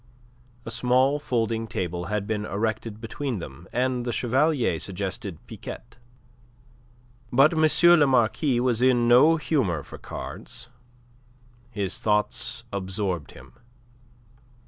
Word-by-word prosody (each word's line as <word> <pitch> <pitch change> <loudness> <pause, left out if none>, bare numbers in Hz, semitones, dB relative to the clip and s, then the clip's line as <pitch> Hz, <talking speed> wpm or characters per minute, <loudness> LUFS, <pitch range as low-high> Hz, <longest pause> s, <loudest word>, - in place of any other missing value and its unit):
A 115 - -5
small 125 +5 +2
folding 115 -4 -1
table 90 -3 -3
had 105 +1 -2
been 105 -1 -2
erected 110 +1 -3
between 120 +2 -4
them, 80 -1 -9
and 125 0 0
the 120 - -2
Chevalier 125 - +1
suggested 95 -1 -4
piquet. 115 0 -10 1.3
But 135 +6 +5
M. 160 +2 +5
le 145 - +5
Marquis 125 +1 +2
was 120 -2 +1
in 125 -2 +3
no 130 +7 +6
humour 125 - 0
for - - -11
cards. 120 -1 -8 1.0
His 100 -5 -2
thoughts 105 -1 0
absorbed 95 -5 -3
him. - - -15
115 Hz, 115 wpm, -25 LUFS, 100-130 Hz, 1.3 s, no